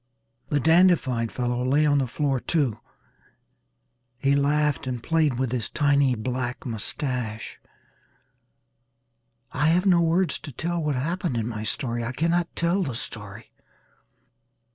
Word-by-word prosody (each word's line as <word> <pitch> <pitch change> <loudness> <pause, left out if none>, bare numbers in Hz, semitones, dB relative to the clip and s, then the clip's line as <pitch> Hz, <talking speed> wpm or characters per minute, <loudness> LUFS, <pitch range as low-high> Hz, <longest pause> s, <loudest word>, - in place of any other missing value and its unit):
The 145 - +1
dandified 150 -7 +3
fellow 125 0 -1
lay 140 +4 +3
on 145 -1 +3
the 130 - 0
floor 135 +2 -1
too. 140 -6 0 1.4
He 140 +2 +2
laughed 145 -1 +1
and 125 -2 -4
played 155 -6 +1
with 130 -2 -1
his 125 -3 -1
tiny 140 -3 +2
black 125 +2 -4
mustache. 115 -1 -3 1.9
I 145 +3 +1
have 175 +4 +3
no 180 -3 +5
words 170 -1 +1
to 145 - -9
tell 170 +6 -2
what 150 -2 -1
happened 165 0 -2
in 115 -1 -1
my 110 -3 -4
story. 120 +1 -2
I 120 +3 -3
cannot 170 +4 0
tell 170 +4 +1
the 135 -10 -2
story. 110 -2 -8
140 Hz, 135 wpm, -25 LUFS, 120-160 Hz, 1.9 s, no